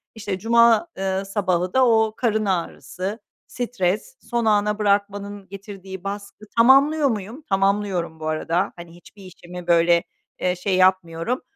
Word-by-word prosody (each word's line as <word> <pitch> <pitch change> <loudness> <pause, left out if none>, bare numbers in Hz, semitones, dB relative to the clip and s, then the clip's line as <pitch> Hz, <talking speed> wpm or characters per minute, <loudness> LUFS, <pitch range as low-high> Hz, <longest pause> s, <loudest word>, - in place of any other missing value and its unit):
İşte, 205 -4 -4
cuma, 235 - +4
eee, 190 0 -1
sabahı 185 -3 -1
da, 260 0 +4
o 220 -1 +3
karın 220 -3 0
ağrısı, 190 +2 -3 0.3
stres, 230 - -2
son 235 -1 -2
ana 210 0 +2
bırakmanın 200 -1 -1
getirdiği 195 -2 -9
baskı, 200 +1 -7
tamamlıyor 280 +5 +5
muyum? 220 +5 -5
Tamamlıyorum, 195 -4 0
bu 155 - -5
arada. 165 +4 -1
Hani, 170 -1 -12
hiçbir 190 +3 -16
işimi, 180 -1 -11
böyle, 170 0 +4 0.4
eee, 180 0 0
şey, 185 +2 -1
yapmıyorum 185 +4 +1
200 Hz, 135 wpm, -22 LUFS, 180-220 Hz, 0.4 s, tamamlıyor